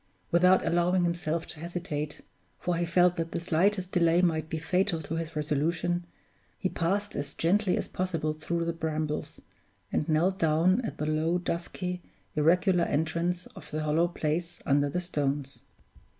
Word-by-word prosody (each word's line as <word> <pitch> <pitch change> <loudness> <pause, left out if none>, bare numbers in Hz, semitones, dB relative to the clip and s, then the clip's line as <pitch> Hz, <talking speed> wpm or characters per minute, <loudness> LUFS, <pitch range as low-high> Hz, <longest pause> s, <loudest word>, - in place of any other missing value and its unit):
Without 180 +2 +5
allowing 175 +1 +2
himself 170 -1 -1
to - - -8
hesitate 160 -3 -4 0.4
(for 175 -1 -1
he 170 +1 0
felt 180 +1 +4
that 165 0 -3
the - - -1
slightest 180 +3 +1
delay 170 -1 +4
might 160 -2 +1
be 160 - -2
fatal 180 +2 +1
to 160 0 -6
his 165 -1 -4
resolution), 165 +4 0 0.5
he 185 - -1
passed 200 +5 -1
as 140 0 -4
gently 185 +3 +2
as - - -2
possible 165 -4 -1
through 170 +2 -2
the 170 - -1
brambles, 155 -2 -3 0.5
and 150 - 0
knelt 175 +5 +2
down 165 +7 +3
at - - -4
the 150 - -2
low, 155 +3 +1
dusky, 180 +1 -3 0.3
irregular 175 +3 +4
entrance 170 +4 0
of 155 -6 -11
the 155 0 -2
hollow 155 +3 +3
place 170 +1 -2
under 145 +1 +3
the 180 +5 -1
stones. 145 -5 -2
170 Hz, 160 wpm, -29 LUFS, 155-180 Hz, 0.5 s, Without